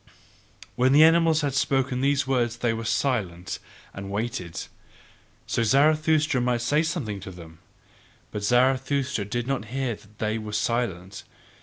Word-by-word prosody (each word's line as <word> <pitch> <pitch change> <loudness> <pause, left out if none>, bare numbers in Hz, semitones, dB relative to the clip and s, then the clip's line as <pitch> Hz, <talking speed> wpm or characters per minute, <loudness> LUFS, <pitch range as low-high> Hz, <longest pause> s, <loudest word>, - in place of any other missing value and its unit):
'" - - -30 0.3
When 130 +2 +3
the 150 +2 +8
animals 165 -1 +5
had 145 -2 -1
spoken 135 -1 0
these 140 0 +2
words 120 -3 0
they 120 -1 0
were 115 0 -5
silent 105 -7 -1 0.3
and 95 0 -7
waited, 105 -4 -4 0.9
so - - -1
that - - +1
Zarathustra 155 +2 +3
might 120 -1 0
say 150 +6 +2
something 150 - -3
to 95 - -8
them: 80 -3 -12 0.7
but 105 - -4
Zarathustra 130 +1 +1
did 120 +3 -3
not 135 -4 -2
hear 130 +1 -2
that 105 0 -16
they 110 +1 -1
were 105 -1 -7
silent. 100 -4 -2
120 Hz, 155 wpm, -25 LUFS, 105-140 Hz, 0.9 s, the